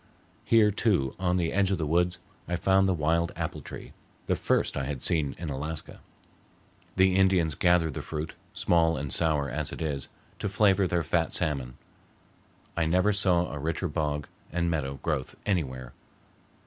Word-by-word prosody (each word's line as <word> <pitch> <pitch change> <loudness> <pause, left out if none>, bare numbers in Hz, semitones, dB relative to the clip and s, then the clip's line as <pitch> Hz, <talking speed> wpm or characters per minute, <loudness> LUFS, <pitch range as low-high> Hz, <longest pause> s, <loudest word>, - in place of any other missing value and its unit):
Here, 110 -2 +5
too, 95 - +1
on 90 -1 +1
the 85 -2 0
edge 100 -1 +2
of 95 - +1
the 80 - -1
woods 90 +3 +1 0.3
I 85 - -1
found 95 +1 +3
the - - +3
wild 85 +2 +1
apple - - -4
tree, - - -9 0.3
the - - +1
first - - 0
I 70 - -2
had 70 -2 -4
seen 75 -4 +1
in 85 -3 -5
Alaska. 75 +3 -5 1.0
The 95 -1 +4
Indians 95 -5 +3
gather 85 0 +3
the - - -5
fruit, 80 0 -5 0.2
small 80 -2 +3
and 70 -1 -2
sour 75 -4 +1
as 75 +3 -2
it - - -7
is, 70 -5 -3 0.3
to 100 - -2
flavor 100 -2 +3
their 85 -1 0
fat 80 +1 0
salmon. 70 -7 -1 1.0
I 80 -1 +1
never 90 +5 +3
saw 90 -3 +2
a 75 - -5
richer 80 +5 -2
bog 75 -2 -2 0.2
and 85 +1 0
meadow 70 -4 -2
growth 65 - -2
anywhere. 65 -10 -2
85 Hz, 170 wpm, -28 LUFS, 75-90 Hz, 1.0 s, Here